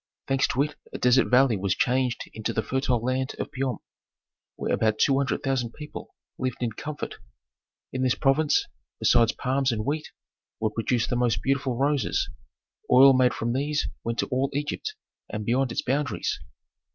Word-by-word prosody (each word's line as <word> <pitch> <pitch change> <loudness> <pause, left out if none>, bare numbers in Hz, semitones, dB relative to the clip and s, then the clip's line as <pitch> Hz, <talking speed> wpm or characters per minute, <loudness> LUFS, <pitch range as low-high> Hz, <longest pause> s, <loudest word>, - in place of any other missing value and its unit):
Thanks 135 0 +2
to 135 - +1
it 150 0 -5 0.2
a - - -5
desert 125 +1 +4
valley 125 -2 +4
was 95 -1 0
changed 125 -1 +1
into 110 -1 -3
the 110 - 0
fertile 125 0 0
land 130 +1 -1
of - - -4
Piom, 130 -5 -2 0.8
where - - -2
about 110 -1 +2
two 135 - +4
hundred 140 -1 -1
thousand 130 -4 -1
people 150 0 -9 0.2
lived 130 -2 -2
in 115 - 0
comfort. 145 +7 -6 0.7
In 130 - -2
this 130 -1 +2
province, 145 +2 +2 0.3
besides 115 -2 +4
palms 135 0 0
and 110 -2 -2
wheat, 150 +3 -2 0.5
were 110 -1 0
produced 115 +1 0
the - - +1
most 115 -5 +1
beautiful 135 -2 0
roses; 140 -3 +1 0.6
oil 135 +2 +8
made 130 -1 +3
from 120 +1 -1
these 145 +3 0
went 115 0 -2
to - - 0
all 135 +1 +1
Egypt, 150 - -3 0.3
and 105 -1 -4
beyond 125 +2 +1
its - - -2
boundaries. 135 -3 -1
130 Hz, 170 wpm, -26 LUFS, 120-135 Hz, 0.8 s, oil